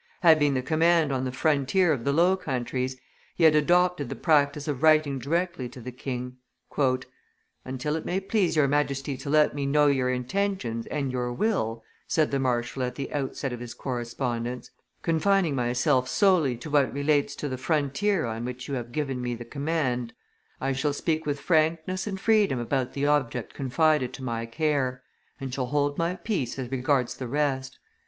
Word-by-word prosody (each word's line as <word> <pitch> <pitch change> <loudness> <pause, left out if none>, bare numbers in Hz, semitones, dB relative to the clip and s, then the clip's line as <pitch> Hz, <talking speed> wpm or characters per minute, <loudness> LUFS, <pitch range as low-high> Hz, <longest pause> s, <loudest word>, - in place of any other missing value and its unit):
Having 155 -5 +5
the 130 - -1
command 160 +1 +3
on 130 -1 -1
the 130 - -2
frontier 155 +5 +2
of 120 -5 -4
the 140 - +2
Low 175 +6 +4
Countries, 130 -6 -3 0.4
he 170 - 0
had 160 -1 +7
adopted 175 -1 +2
the - - -4
practice 145 -2 +2
of 145 -3 -2
writing 155 -3 +4
directly 165 -2 -1
to 125 - -11
the 125 +1 -7
king. 125 0 -5 1.3
"Until 130 +4 -3
it 160 - -3
may 185 - -1
please 195 -3 0
your 150 -3 +4
Majesty 140 -1 0
to 140 - -7
let 150 0 +4
me 140 -1 -2
know 150 +1 +4
your 135 -3 +2
intentions 125 - -2
and 140 -3 -2
your 125 -1 -2
will," 120 - -1 0.2
said 155 -2 +1
the 140 - +1
marshal 125 0 -1
at 125 0 -2
the 135 - -5
outset 135 -2 -2
of 120 - -6
his 120 -1 -8
correspondence, 120 -1 -4 0.3
"confining 170 0 +2
myself 130 +1 +1
solely 175 - +3
to 145 +5 -8
what 145 -3 +3
relates 145 +1 +1
to 150 - -4
the 130 - -3
frontier 155 +6 0
on 115 0 -4
which 125 +1 -6
you 140 - -4
have 120 -2 -4
given 135 -2 -2
me 120 -1 -2
the 120 0 -8
command, 140 -3 -2 0.5
I 135 - -1
shall 140 +2 0
speak 160 +1 -1
with 145 -1 -1
frankness 165 +4 +1
and 195 -2 -4
freedom 210 - +3
about 125 +1 -1
the 140 0 -1
object 130 -6 0
confided 140 0 +1
to 135 - -8
my 115 -2 -3
care, 130 -2 -1 0.4
and 135 -2 -5
shall 125 -1 -2
hold 145 +1 0
my 170 +2 0
peace 175 - -3
as 130 -2 -5
regards 130 -1 +1
the 130 - -5
rest. 135 -1 -1
140 Hz, 180 wpm, -26 LUFS, 125-155 Hz, 1.3 s, had